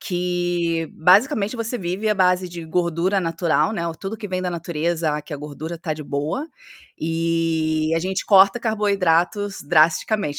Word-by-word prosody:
que, 175 Hz, -3 st, -1 dB
basicamente, 200 Hz, +5 st, +3 dB
você 230 Hz, +2 st, -3 dB
vive 190 Hz, +4 st, -2 dB
à 210 Hz, -, +3 dB
base 180 Hz, -1 st, +2 dB
de 170 Hz, -1 st, -8 dB
gordura 170 Hz, +3 st, 0 dB
natural, 165 Hz, +4 st, 0 dB
né. 170 Hz, -5 st, -2 dB
Ou 165 Hz, -, -5 dB
tudo 195 Hz, +6 st, -6 dB
que 210 Hz, -2 st, -7 dB
vem 185 Hz, 0 st, -2 dB
da 180 Hz, -, -2 dB
natureza 170 Hz, -1 st, -2 dB
a 150 Hz, -, -3 dB
que 150 Hz, -, -11 dB
a -, -, -5 dB
gordura 155 Hz, +3 st, -7 dB
tá, 160 Hz, -3 st, -3 dB
de 155 Hz, -, -8 dB
boa. 150 Hz, -, -3 dB, 0.5 s
E 165 Hz, -1 st, 0 dB
a -, -, 0 dB
gente 185 Hz, +2 st, -3 dB
corta 195 Hz, +3 st, +6 dB
carboidratos 200 Hz, -3 st, 0 dB
drasticamente, 155 Hz, 0 st, +2 dB
175 Hz, 165 wpm, -22 LUFS, 160-195 Hz, 0.5 s, corta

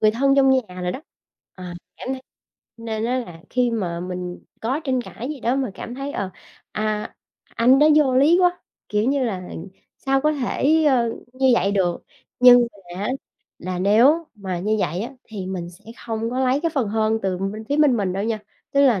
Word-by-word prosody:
người 215 Hz, -, +5 dB
thân 275 Hz, +5 st, +2 dB
trong 270 Hz, -1 st, +5 dB
nhà 220 Hz, -9 st, 0 dB
rồi 180 Hz, 0 st, -1 dB
đó. 260 Hz, -, -6 dB, 0.5 s
Ờ, 185 Hz, -, -10 dB, 0.3 s
cảm -, -, -8 dB
thấy 265 Hz, -, -5 dB, 0.6 s
nên 225 Hz, -1 st, -4 dB
á 250 Hz, +2 st, 0 dB
là 175 Hz, -9 st, -8 dB
khi 250 Hz, -1 st, +2 dB
mà 180 Hz, -7 st, -2 dB
mình 180 Hz, 0 st, -6 dB, 0.2 s
có 260 Hz, +7 st, -1 dB
tranh 260 Hz, -3 st, 0 dB
cãi 240 Hz, +1 st, -7 dB
gì 295 Hz, -3 st, -6 dB
đó 240 Hz, +3 st, +1 dB
mà 265 Hz, -5 st, -1 dB
cảm 240 Hz, -, -7 dB
thấy, 275 Hz, +2 st, -5 dB
ờ, 190 Hz, -, -3 dB, 0.4 s
à, 215 Hz, 0 st, -2 dB, 0.4 s
anh 250 Hz, +3 st, +5 dB
đó 300 Hz, -, +6 dB
vô 270 Hz, -4 st, +4 dB
lý 305 Hz, +7 st, +5 dB
quá, 355 Hz, 0 st, +2 dB, 0.3 s
kiểu 210 Hz, 0 st, +1 dB
như 275 Hz, -1 st, +1 dB
là, 190 Hz, -6 st, -2 dB, 0.6 s
sao 270 Hz, 0 st, +1 dB
có 305 Hz, +2 st, +2 dB
thể, 300 Hz, +3 st, +1 dB
ờ, 245 Hz, -5 st, +3 dB, 0.2 s
như 260 Hz, 0 st, +2 dB
vậy 195 Hz, -2 st, +1 dB
được. 180 Hz, -3 st, 0 dB, 0.4 s
Nhưng 245 Hz, -1 st, +8 dB
mà 180 Hz, -2 st, -10 dB
á, 245 Hz, -, -1 dB, 0.5 s
là 180 Hz, +1 st, -4 dB
nếu 240 Hz, -, +4 dB
mà 190 Hz, -4 st, -4 dB
như 215 Hz, +3 st, +1 dB
vậy 170 Hz, +2 st, -1 dB
á, 245 Hz, +4 st, -6 dB
thì 205 Hz, -5 st, -7 dB
mình 180 Hz, -2 st, -4 dB
sẽ 175 Hz, -, -19 dB, 0.2 s
hông 225 Hz, 0 st, -2 dB
có 255 Hz, +2 st, -1 dB
lấy 260 Hz, +2 st, +2 dB
cái 335 Hz, -, 0 dB
phần 250 Hz, -7 st, +1 dB
hơn 220 Hz, +1 st, +1 dB
từ 190 Hz, -2 st, -1 dB
bên 200 Hz, +3 st, -4 dB
phía 285 Hz, -, +1 dB
bên 295 Hz, -5 st, +4 dB
mình 195 Hz, -4 st, -1 dB
đâu 195 Hz, +2 st, -2 dB
nha, 225 Hz, -1 st, -1 dB, 0.3 s
tức 280 Hz, -, +3 dB
là 245 Hz, -8 st, +4 dB
230 Hz, 210 wpm, -22 LUFS, 195-265 Hz, 0.6 s, Nhưng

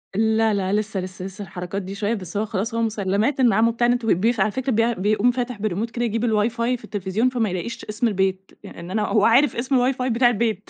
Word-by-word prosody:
لا 220 Hz, +1 st, +2 dB
لا 195 Hz, 0 st, -1 dB
لسه، 210 Hz, -2 st, -1 dB
لسه، 185 Hz, 0 st, -6 dB
لسه 195 Hz, +1 st, -8 dB
الحركات 185 Hz, +1 st, -5 dB
دي 190 Hz, +2 st, -7 dB
شوية 210 Hz, +2 st, -1 dB
بس 190 Hz, -2 st, -5 dB
هو 215 Hz, -, 0 dB
خلاص 220 Hz, +2 st, -3 dB
هو 230 Hz, -, 0 dB
مُسَلَّمَات 215 Hz, +4 st, 0 dB
إن 240 Hz, -5 st, +4 dB
عمو 230 Hz, +3 st, +3 dB
بتاع 240 Hz, +1 st, +1 dB
النت 245 Hz, -1 st, +1 dB
بيق 220 Hz, +2 st, +2 dB
على 210 Hz, -, +2 dB
فكرة 260 Hz, +2 st, -2 dB
بي 230 Hz, +2 st, +2 dB
بيقوم 215 Hz, +5 st, +2 dB
فاتح 245 Hz, -3 st, -4 dB
بالريموت 215 Hz, +2 st, -2 dB
كده 240 Hz, -1 st, -2 dB
يجيب 230 Hz, +1 st, -1 dB
الWIFI 220 Hz, 0 st, +2 dB, 0.3 s
في -, -, -22 dB
التليفزيون 205 Hz, +4 st, -1 dB
فما 235 Hz, -5 st, -1 dB
يلاقيش 230 Hz, +7 st, -5 dB
اسم 215 Hz, +3 st, -1 dB
البيت، 190 Hz, -2 st, -1 dB
يع -, -, -11 dB
ان 170 Hz, +2 st, -8 dB
أنا 215 Hz, +1 st, 0 dB
هو 210 Hz, -2 st, +3 dB
عارف 265 Hz, +6 st, +4 dB
اسم 255 Hz, +1 st, +1 dB
الWIFI 255 Hz, -1 st, -3 dB
بتاع 240 Hz, +1 st, +4 dB
البيت 220 Hz, -3 st, -1 dB
220 Hz, 235 wpm, -22 LUFS, 195-235 Hz, 0.3 s, إن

